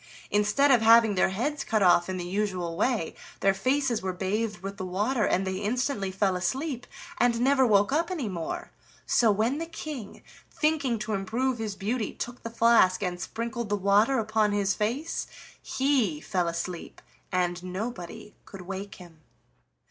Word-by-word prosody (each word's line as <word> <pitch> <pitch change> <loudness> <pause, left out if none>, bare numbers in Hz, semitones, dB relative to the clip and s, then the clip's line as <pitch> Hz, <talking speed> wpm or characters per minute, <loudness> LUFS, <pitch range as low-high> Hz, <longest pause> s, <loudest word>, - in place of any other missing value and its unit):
Instead 210 +8 +3
of 245 -3 +5
having 225 -1 +6
their 190 - +3
heads 275 +10 -2
cut 215 -3 +1
off 175 0 +4
in 185 - -2
the 175 - -4
usual 185 -3 -2
way, 220 -3 0 0.3
their 195 0 +4
faces 255 +3 0
were 190 - -2
bathed 195 +2 -2
with 195 +1 -5
the 190 - -5
water, 210 +5 0
and 190 - +1
they 190 0 -2
instantly 210 0 -1
fell 190 0 0
asleep 250 - -2 0.3
and 235 -1 +3
never 265 +1 +4
woke 205 0 +4
up 330 +4 +1
any 320 -11 -3
more. 170 -5 -5 0.3
So, 230 - +3
when 225 +8 +1
the 330 - -4
King, 305 -8 -7 0.3
thinking 300 -6 0
to 215 0 -3
improve 235 +6 -1
his 215 -3 -3
beauty, 220 +3 -2
took 245 +1 -6
the 230 - -5
flask 230 -5 +4
and 180 -1 -3
sprinkled 230 +2 -4
the 205 - +2
water 205 +6 +3
upon 215 -2 +1
his 200 -1 +1
face, 245 +10 -2 0.3
he 260 - +1
fell 180 +1 -1
asleep, 170 +1 -5 0.3
and 180 -1 0
nobody 185 0 -6
could 195 - -11
wake 195 +2 -6
him. 170 -4 -15
210 Hz, 170 wpm, -27 LUFS, 190-245 Hz, 0.3 s, having